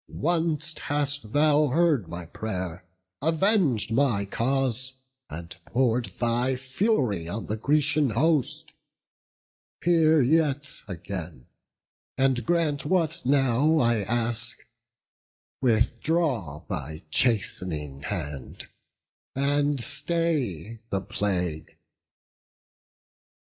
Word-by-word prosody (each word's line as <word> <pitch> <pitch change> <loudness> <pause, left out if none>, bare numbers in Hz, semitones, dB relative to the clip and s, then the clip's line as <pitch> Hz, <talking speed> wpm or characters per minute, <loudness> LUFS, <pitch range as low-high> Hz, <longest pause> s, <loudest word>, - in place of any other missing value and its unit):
Once 160 -2 +1
hast 145 -5 -1
thou 150 +1 +4
heard 150 - +2
my 85 0 -6
pray'r, 90 -2 -5 0.4
aveng'd 160 - +2
my 115 -5 +2
cause, 130 +3 -1 0.3
And 85 +2 -8
pour'd 120 -1 +1
thy 120 +2 +1
fury 130 - 0
on 105 +2 -4
the 105 - -2
Grecian 150 +3 +2
host. 145 +4 0 1.1
Hear 160 -2 +4
yet 145 +1 +1
again, 85 -7 -6 0.7
and 130 -2 +2
grant 160 -5 +1
what 165 -1 +1
now 140 +3 +3
I 120 -6 +2
ask; 115 +2 0 1.0
Withdraw 115 - +1
thy 75 +3 -5
chast'ning 80 - 0
hand, 75 -3 -5 0.7
and 145 +1 +1
stay 120 - -1
the 95 - -1
plague." 90 -6 -2
130 Hz, 85 wpm, -26 LUFS, 100-150 Hz, 1.1 s, thou